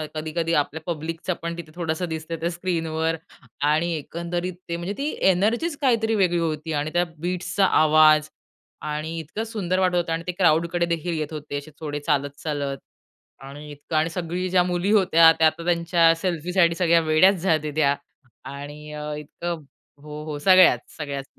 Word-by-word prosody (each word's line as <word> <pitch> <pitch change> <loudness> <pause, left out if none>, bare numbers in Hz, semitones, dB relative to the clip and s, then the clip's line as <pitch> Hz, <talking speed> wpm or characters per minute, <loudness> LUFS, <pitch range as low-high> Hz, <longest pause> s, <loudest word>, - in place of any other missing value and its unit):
कधी-कधी 160 +2 -2
आपल्या 145 +2 -7
पब्लिकचं 165 +2 -3
पण 170 0 -4
तिथे 165 -2 -9
थोडंसं 170 0 -2
दिसतंय, 160 +1 -5
त्या 165 +1 -2
स्क्रीनवर. 165 -2 -1 0.6
आणि 165 +3 +1
एकंदरीत 170 +4 -4 0.2
ते 170 - -2
म्हणजे, 175 +4 -4
ती 280 - -3 0.2
एनर्जीच 230 - +1
काहीतरी 225 -4 +2
वेगळी 175 -2 +2
होती 160 -1 -2
आणि 150 +1 -2
त्या 175 0 +3
बीट्सचा 180 +4 0 0.2
आवाज 155 0 +5 0.6
आणि 155 +2 -4
इतकं 165 +8 -5
सुंदर 185 -5 -1
वाटत 185 -1 +2
होतं 170 -2 0
आणि 165 +1 -3
ते - - 0
क्राउडकडे 170 -1 +2
देखील 170 0 -2
येत 155 +1 -4
होते 150 -1 -5
असे 145 +2 -8
थोडे 150 -2 -4
चालत-चालत. 145 -1 -2 0.6
आणि 145 +2 -10
इतकं 145 +2 -7
आणि 155 +2 +2
सगळी 175 +2 -3
ज्या 180 0 +4
मुली 180 +2 -1
होत्या 175 -6 +6
त्या 160 - +6
आता 160 +1 -2
त्यांच्या 170 -1 +3
सेल्फीसाठी 170 0 +1
सगळ्या 170 -1 +3
वेड्याच 155 +6 +5
झालते, 155 -4 +1
त्या 140 -2 +3 0.6
आणि 145 +1 -9 0.3
इतकं 165 +2 -6 0.4
हो, 150 0 -8
हो 150 -2 -4
सगळ्याच, 185 +3 +6 0.2
सगळ्याच. 140 -3 -5
165 Hz, 160 wpm, -24 LUFS, 155-175 Hz, 0.6 s, होत्या